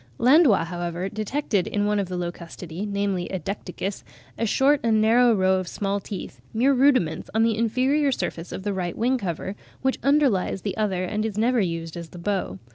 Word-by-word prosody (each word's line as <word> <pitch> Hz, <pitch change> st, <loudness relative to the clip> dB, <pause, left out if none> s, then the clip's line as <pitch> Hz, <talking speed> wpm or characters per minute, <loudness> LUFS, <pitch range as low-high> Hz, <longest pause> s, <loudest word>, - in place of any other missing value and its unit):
Landois, 255 Hz, -, +5 dB
however, 175 Hz, +2 st, -4 dB
detected 215 Hz, -1 st, -1 dB
in 205 Hz, 0 st, 0 dB
one 210 Hz, 0 st, +1 dB
of 195 Hz, -2 st, -2 dB
the 180 Hz, -, -3 dB
Locustidae, 175 Hz, +1 st, -6 dB
namely 200 Hz, -3 st, -1 dB
in 190 Hz, -, -4 dB
Decticus, 195 Hz, 0 st, -4 dB, 0.3 s
a 230 Hz, -, -1 dB
short 275 Hz, +6 st, +3 dB
and 225 Hz, -2 st, +2 dB
narrow 235 Hz, +3 st, +5 dB
row 190 Hz, -1 st, +3 dB
of 185 Hz, -, -5 dB
small 200 Hz, +2 st, -2 dB
teeth, 200 Hz, -1 st, -8 dB
mere 260 Hz, +5 st, +4 dB
rudiments, 255 Hz, -, +2 dB
on 220 Hz, -, +4 dB
the 225 Hz, -1 st, +2 dB
inferior 260 Hz, +6 st, +2 dB
surface 175 Hz, -8 st, -4 dB
of 190 Hz, -, -6 dB
the 205 Hz, 0 st, -1 dB
right 180 Hz, -3 st, -3 dB
wing 250 Hz, +3 st, +1 dB
cover, 190 Hz, 0 st, -4 dB, 0.3 s
which 265 Hz, 0 st, +1 dB
underlies 270 Hz, -10 st, +2 dB
the 200 Hz, -, -2 dB
other 195 Hz, -4 st, 0 dB
and 210 Hz, +3 st, -2 dB
is 215 Hz, -2 st, -3 dB
never 235 Hz, +2 st, +2 dB
used 165 Hz, -2 st, -3 dB
as 170 Hz, -1 st, -7 dB
the -, -, -12 dB
bow. 185 Hz, -, -2 dB
205 Hz, 195 wpm, -24 LUFS, 180-235 Hz, 0.3 s, Landois